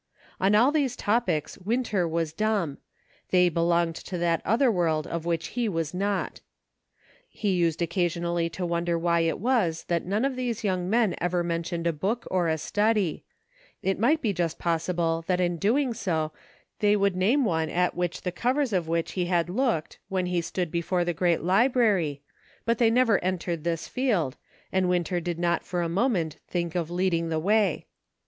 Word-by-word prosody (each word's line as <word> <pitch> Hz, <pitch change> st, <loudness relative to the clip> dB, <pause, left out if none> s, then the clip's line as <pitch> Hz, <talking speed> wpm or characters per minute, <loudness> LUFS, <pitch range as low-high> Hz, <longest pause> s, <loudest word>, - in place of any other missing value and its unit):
On 195 Hz, +2 st, +3 dB
all 245 Hz, +6 st, +5 dB
these 280 Hz, -5 st, 0 dB
topics 210 Hz, -11 st, 0 dB
Winter 210 Hz, -2 st, 0 dB
was 165 Hz, -1 st, -1 dB
dumb; 200 Hz, -6 st, -1 dB, 0.5 s
they 180 Hz, -1 st, +4 dB
belonged 170 Hz, 0 st, +1 dB
to 180 Hz, -, -6 dB
that 170 Hz, -1 st, +1 dB
other 235 Hz, +5 st, +3 dB
world 165 Hz, -5 st, +1 dB
of 170 Hz, -1 st, -4 dB
which 165 Hz, -1 st, -1 dB
he 240 Hz, -2 st, -1 dB
was 165 Hz, -4 st, -2 dB
not. 200 Hz, +1 st, -2 dB, 0.9 s
He 205 Hz, -2 st, -2 dB
used 170 Hz, -2 st, +1 dB
occasionally 170 Hz, 0 st, 0 dB
to 180 Hz, +2 st, -4 dB
wonder 170 Hz, 0 st, 0 dB
why 170 Hz, 0 st, +2 dB
it 165 Hz, 0 st, +1 dB
was 205 Hz, -8 st, +1 dB
that 170 Hz, -1 st, +1 dB
none 205 Hz, +7 st, 0 dB
of 275 Hz, -1 st, -1 dB
these 245 Hz, -3 st, -3 dB
young 185 Hz, -3 st, -1 dB
men 220 Hz, -3 st, +3 dB
ever 175 Hz, 0 st, +1 dB
mentioned 170 Hz, 0 st, -3 dB
a 170 Hz, -, +2 dB
book 200 Hz, +10 st, -2 dB
or 180 Hz, -2 st, +2 dB
a 160 Hz, 0 st, +1 dB
study; 205 Hz, 0 st, 0 dB, 0.6 s
it 190 Hz, 0 st, 0 dB
might 290 Hz, +8 st, +2 dB
be 210 Hz, -4 st, +1 dB
just 170 Hz, -2 st, -1 dB
possible 165 Hz, -1 st, 0 dB
that 180 Hz, -1 st, +1 dB
in 175 Hz, -1 st, +1 dB
doing 240 Hz, -, +1 dB
so 160 Hz, -8 st, -1 dB, 0.5 s
they 210 Hz, 0 st, +4 dB
would 200 Hz, -2 st, +2 dB
name 230 Hz, +9 st, +2 dB
one 160 Hz, -5 st, 0 dB
at 180 Hz, +2 st, +1 dB
the 180 Hz, +1 st, -2 dB
covers 250 Hz, +6 st, 0 dB
of 175 Hz, -4 st, 0 dB
which 165 Hz, 0 st, -1 dB
he 180 Hz, -2 st, -1 dB
had 175 Hz, -1 st, 0 dB
looked, 225 Hz, -, -1 dB
when 190 Hz, -2 st, 0 dB
he 180 Hz, -1 st, 0 dB
stood 175 Hz, 0 st, -3 dB
before 175 Hz, +1 st, 0 dB
the 175 Hz, -, 0 dB
great 170 Hz, 0 st, +1 dB
library, 195 Hz, -, +2 dB, 0.4 s
but 230 Hz, 0 st, +1 dB
they 230 Hz, -2 st, +5 dB
never 230 Hz, -2 st, +3 dB
entered 175 Hz, -3 st, -2 dB
this 170 Hz, -1 st, -2 dB
field, 205 Hz, -, 0 dB, 0.4 s
and 185 Hz, -1 st, +1 dB
Winter 175 Hz, 0 st, 0 dB
did 175 Hz, -1 st, -3 dB
not 170 Hz, 0 st, 0 dB
for 175 Hz, -1 st, -2 dB
a -, -, 0 dB
moment 175 Hz, -, 0 dB
think 170 Hz, -2 st, -2 dB
of 170 Hz, -3 st, -2 dB
leading 175 Hz, -2 st, 0 dB
the 160 Hz, -, 0 dB
way. 200 Hz, 0 st, +1 dB
180 Hz, 180 wpm, -26 LUFS, 170-210 Hz, 0.9 s, all